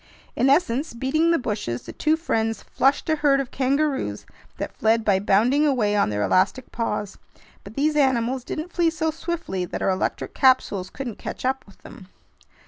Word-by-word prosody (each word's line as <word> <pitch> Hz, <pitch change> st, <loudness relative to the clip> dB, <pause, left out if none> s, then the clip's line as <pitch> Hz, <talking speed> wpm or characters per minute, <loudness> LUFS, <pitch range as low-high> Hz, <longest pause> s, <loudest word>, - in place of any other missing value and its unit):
In 265 Hz, -, +2 dB
essence, 280 Hz, -2 st, +1 dB
beating 290 Hz, +7 st, +1 dB
the 335 Hz, -, +4 dB
bushes, 205 Hz, -, -3 dB
the -, -, -9 dB
two 310 Hz, +1 st, +1 dB
friends 225 Hz, -9 st, -1 dB
flushed 275 Hz, +2 st, +1 dB
a 315 Hz, -1 st, +1 dB
herd 285 Hz, -2 st, +3 dB
of 270 Hz, -3 st, -4 dB
kangaroos 270 Hz, -, -1 dB, 0.3 s
that -, -, -5 dB
fled 225 Hz, 0 st, +2 dB
by 195 Hz, -2 st, +3 dB
bounding 225 Hz, +9 st, +3 dB
away 240 Hz, -8 st, +2 dB
on 205 Hz, -, +2 dB
their 105 Hz, 0 st, -1 dB
elastic 195 Hz, -, +1 dB
paws. 210 Hz, -3 st, -3 dB, 0.4 s
But 200 Hz, +2 st, -12 dB
these 300 Hz, +2 st, +1 dB
animals 260 Hz, -3 st, +1 dB
didn't 315 Hz, +6 st, -6 dB
flee 345 Hz, -2 st, +3 dB
so 320 Hz, 0 st, -1 dB
swiftly 325 Hz, -, -4 dB
that -, -, -5 dB
our -, -, +2 dB
electric 185 Hz, -, -2 dB
capsules 255 Hz, -8 st, +2 dB
couldn't 250 Hz, -5 st, -6 dB
catch -, -, -6 dB
up 265 Hz, +1 st, 0 dB
with 200 Hz, -, -20 dB
them. 185 Hz, -, -12 dB
260 Hz, 180 wpm, -23 LUFS, 210-300 Hz, 0.4 s, the